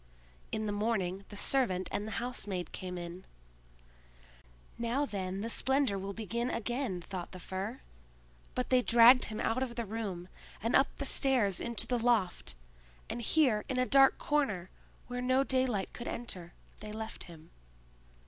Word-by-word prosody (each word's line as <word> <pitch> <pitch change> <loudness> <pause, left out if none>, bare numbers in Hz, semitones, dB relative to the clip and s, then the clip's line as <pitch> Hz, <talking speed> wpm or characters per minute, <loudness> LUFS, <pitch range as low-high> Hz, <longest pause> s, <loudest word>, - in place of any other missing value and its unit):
In 215 - -1
the 210 - -1
morning 200 -3 -1
the 205 - -8
servant 195 -8 +2
and 210 - -2
the 220 - -5
housemaid 210 -7 -3
came 180 -1 -5
in. 175 +1 -7 1.6
"Now 240 +5 +1
then 195 -4 -3
the 225 - -2
splendor 265 -2 +2
will 195 0 -4
begin 225 +4 -2
again," 235 -5 -2
thought 180 0 -6
the 185 - -8
Fir. 195 +7 -5 0.7
But 250 - -2
they 255 -1 +6
dragged 240 +2 +7
him 215 - -5
out 235 +3 0
of 250 -3 -2
the 235 -1 -2
room, 200 -5 -4 0.3
and 230 - 0
up 270 - +6
the 280 - -3
stairs 245 -9 +2
into 235 -1 -1
the 245 -1 0
loft; 220 - +1 0.6
and 240 - -3
here, 240 -5 +3
in 260 - -1
a 255 - +3
dark 270 0 +6
corner, 215 -12 0 0.3
where 245 0 -4
no 255 +2 +3
daylight 255 -7 0
could 240 - -7
enter, 180 -7 -5 0.3
they 210 0 -7
left 220 +1 -6
him. 165 -2 -14
225 Hz, 160 wpm, -32 LUFS, 190-250 Hz, 1.6 s, dragged